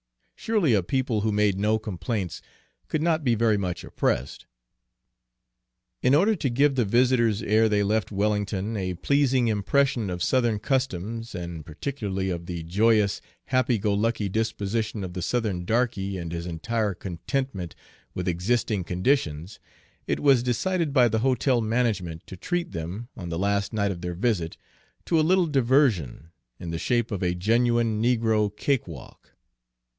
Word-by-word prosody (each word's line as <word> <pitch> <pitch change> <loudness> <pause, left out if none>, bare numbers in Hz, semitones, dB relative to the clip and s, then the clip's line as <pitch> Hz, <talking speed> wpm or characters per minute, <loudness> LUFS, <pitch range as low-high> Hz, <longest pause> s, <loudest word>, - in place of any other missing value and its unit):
Surely 205 - +1
a 100 - +4
people 120 +2 -1
who 110 +1 0
made 105 -2 +2
no 105 +2 +2
complaints 105 -2 -4 0.5
could 155 - -1
not 160 -2 +1
be 120 -4 +2
very 110 -1 +2
much 90 -3 -3
oppressed. 65 +2 -2 1.5
In 130 +2 +4
order 200 +8 +4
to 140 - -1
give 140 +4 +3
the 130 -2 +2
visitors, 120 -1 +2
ere 110 +1 +3
they 105 -1 +2
left 105 0 0
Wellington, 105 +1 -1
a 95 -3 -2
pleasing 130 +4 +2
impression 115 +1 +1
of 90 -1 -3
Southern 120 -4 +2
customs, 115 -2 -2
and 85 -3 -6
particularly 95 - -3
of 85 -1 -5
the 85 -2 -4
joyous, 105 +4 +2 0.2
happy 130 -2 +2
go 105 0 0
lucky 110 0 0
disposition 110 0 -2
of 90 -1 -6
the 90 - -4
Southern 105 -3 -1
darky 100 -3 0
and 85 -2 -5
his 85 +1 -4
entire 105 +4 -2
contentment 95 +2 -4 0.4
with 90 0 -3
existing 100 +3 0
conditions, 90 - -1 0.5
it - - 0
was 135 -4 +4
decided 155 +7 0
by 130 -3 +5
the 110 -1 0
hotel 130 0 +2
management 110 -8 -1
to - - -9
treat 175 - -3
them, 85 +8 -5
on 90 -5 -7
the 85 - -3
last 100 +2 0
night 100 -3 0
of 85 -3 -6
their 90 -1 -4
visit, 90 -5 -1 0.5
to 165 - +2
a - - +5
little 180 +3 +3
diversion, 120 - +1 0.3
in 85 - -5
the 85 - -3
shape 120 +2 0
of 100 - -3
a 90 -1 0
genuine 115 +2 +2
negro 110 -3 +2
cakewalk. 95 - -3
110 Hz, 155 wpm, -25 LUFS, 90-125 Hz, 1.5 s, by